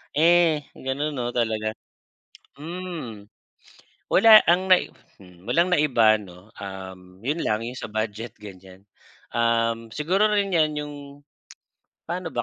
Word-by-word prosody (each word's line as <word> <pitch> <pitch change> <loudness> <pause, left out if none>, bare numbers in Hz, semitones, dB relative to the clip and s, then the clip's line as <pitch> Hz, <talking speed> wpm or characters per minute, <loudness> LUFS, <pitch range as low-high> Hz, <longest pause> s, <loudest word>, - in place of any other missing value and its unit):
Eh 165 -1 +4
ganun 140 +3 -3
'no 120 0 -3
talaga 110 -2 -1 0.8
hmm, 155 - -7 0.8
wala 215 +2 +9
ang 185 +2 +2
nai 185 - +4 0.3
hmm, 90 -2 -18
wala - - 0
ang 180 - -4
naiba'no, 110 - +1
um, 95 -1 -8 0.2
yun 150 +5 -1
lang 110 +2 -1
'yung 125 +1 -7
sa 110 - -7
budget 110 +1 -4
ganiyan. 95 -1 -13 0.5
Um, 115 -1 0
siguro 185 - +1
rin 200 -3 0
'yan 155 -2 +2
'yung 150 0 -6 1.1
paano 175 +1 -4
ba 120 - 0
120 Hz, 125 wpm, -24 LUFS, 110-165 Hz, 1.1 s, wala